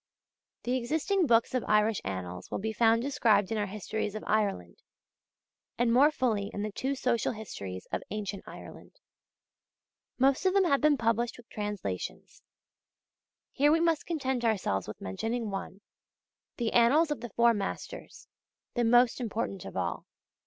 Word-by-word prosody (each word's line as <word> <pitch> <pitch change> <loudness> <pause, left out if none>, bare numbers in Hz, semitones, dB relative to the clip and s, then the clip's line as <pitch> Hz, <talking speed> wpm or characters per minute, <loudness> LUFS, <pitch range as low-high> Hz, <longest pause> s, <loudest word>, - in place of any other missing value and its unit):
The 250 +1 0
existing 315 +8 0
books 230 0 +3
of 255 - 0
Irish 210 0 +3
Annals 90 -2 -5
will - - -2
be 220 +2 -3
found 230 +1 +3
described 225 -8 +2
in 225 - 0
our 205 - -1
Histories 210 +1 -4
of 215 - -5
Ireland, 200 - 0 1.0
and 235 -1 +2
more 275 +5 +6
fully 225 -9 -1
in 205 - -4
the 215 - -3
two 265 +7 -2
Social 245 -3 0
Histories 100 - -7
of - - -1
Ancient 205 -2 -4
Ireland. - - -11 1.2
Most 270 +7 +3
of 375 - +1
them 395 - +5
have 280 -6 +2
been 300 -1 +4
published 230 0 0
with 240 -1 -15
translations. 205 - -5 1.1
Here 290 +2 +3
we 325 - +4
must 330 -2 +1
content 265 -7 -1
ourselves 190 - 0
with 105 - -8
mentioning 225 - -3
one, 195 0 -6 0.8
the 235 -2 -1
Annals 290 +7 +4
of 295 - -2
the 240 - -6
Four 235 +3 +4
Masters, 210 - -6 0.5
the 240 - +1
most 240 +2 +4
important 215 -4 -3
of - - -7
all. 90 -2 -3
230 Hz, 155 wpm, -29 LUFS, 205-260 Hz, 1.2 s, more